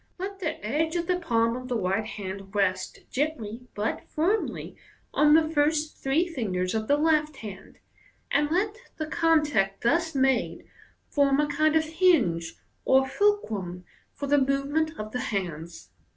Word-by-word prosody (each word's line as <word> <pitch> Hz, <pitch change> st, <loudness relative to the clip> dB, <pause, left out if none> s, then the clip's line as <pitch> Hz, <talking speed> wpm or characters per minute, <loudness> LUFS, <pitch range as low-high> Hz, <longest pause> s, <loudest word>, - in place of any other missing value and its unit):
Let 390 Hz, +1 st, -5 dB
the 320 Hz, -4 st, -3 dB
edge 315 Hz, +8 st, 0 dB
of 345 Hz, -1 st, 0 dB
the 360 Hz, +1 st, 0 dB
palm 230 Hz, -7 st, +1 dB
of 255 Hz, 0 st, -6 dB
the 245 Hz, -2 st, -1 dB
right 195 Hz, +1 st, 0 dB
hand 195 Hz, -1 st, -7 dB
rest 190 Hz, -2 st, 0 dB
gently, 250 Hz, -5 st, -3 dB
but 210 Hz, +2 st, -3 dB
firmly, 375 Hz, +8 st, -1 dB, 0.4 s
on 300 Hz, 0 st, +5 dB
the 320 Hz, -1 st, +4 dB
first 310 Hz, 0 st, +1 dB
three 300 Hz, +6 st, +1 dB
fingers 185 Hz, -, -2 dB
of 220 Hz, -1 st, -2 dB
the 285 Hz, -, +4 dB
left 305 Hz, -1 st, +2 dB
hand, 200 Hz, -3 st, -10 dB, 0.5 s
and 295 Hz, 0 st, +2 dB
let 400 Hz, +6 st, 0 dB, 0.2 s
the 310 Hz, -, -2 dB
contact 300 Hz, -, +1 dB
thus 325 Hz, +5 st, +1 dB
made 265 Hz, -2 st, +1 dB, 0.4 s
form 280 Hz, -1 st, +2 dB
a 300 Hz, -, +3 dB
kind 305 Hz, +2 st, +1 dB
of 315 Hz, -, +4 dB
hinge 310 Hz, -, +2 dB, 0.3 s
or 265 Hz, 0 st, +4 dB
fulcrum 215 Hz, -, 0 dB, 0.3 s
for 285 Hz, -, -4 dB
the 290 Hz, +1 st, +3 dB
move 275 Hz, +1 st, 0 dB
ment 315 Hz, +1 st, 0 dB
of 215 Hz, 0 st, -6 dB
the 250 Hz, -, -3 dB
hands. 170 Hz, -, -4 dB
280 Hz, 160 wpm, -27 LUFS, 215-315 Hz, 0.5 s, on